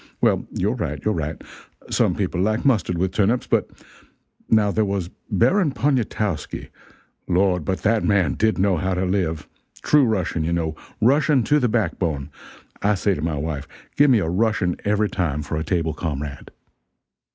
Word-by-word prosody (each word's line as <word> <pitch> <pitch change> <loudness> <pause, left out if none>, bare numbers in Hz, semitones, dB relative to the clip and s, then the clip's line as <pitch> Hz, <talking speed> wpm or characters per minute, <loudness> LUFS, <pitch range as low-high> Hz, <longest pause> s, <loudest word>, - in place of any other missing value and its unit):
Well, - - +2
you're - - 0
right, 75 0 -3
you're 110 - +2
right. 80 -2 -3 0.5
Some - - +2
people 90 - -1
like 110 +6 0
mustard 105 -9 +2
with 95 +2 0
turnips, 110 +5 +1
but - - +1 0.8
now 105 -2 +4
there 110 - +1
was 95 -3 -2 0.2
Baron 140 - +3
Poniatowski 110 - -1 0.6
Lord, 90 -1 +2
but 95 +4 -3
that 110 0 +2
man 100 -7 +2
did 110 0 +1
know 95 -1 +2
how 95 +3 -1
to 90 +1 0
live! 85 -5 -1 0.4
true 150 -1 +4
Russian 95 -7 -1
you 85 +2 -1
know, 80 -2 -1 0.3
Russian 140 +2 +4
to 150 +7 +3
the 125 -3 +1
back 105 -6 0
bone; 75 -5 -2 0.5
I 105 +1 +2
say 100 +1 +1
to 75 - -4
my 80 -1 -1
wife, 75 -1 -4 0.3
give 145 0 +5
me 125 - +5
a 100 - 0
Russian 95 -1 +1
every 105 +1 +2
time, 75 -7 -2
for 75 - -4
a 80 - -2
table 80 -3 -1
comrade. 75 -3 -5
95 Hz, 175 wpm, -22 LUFS, 80-110 Hz, 0.8 s, give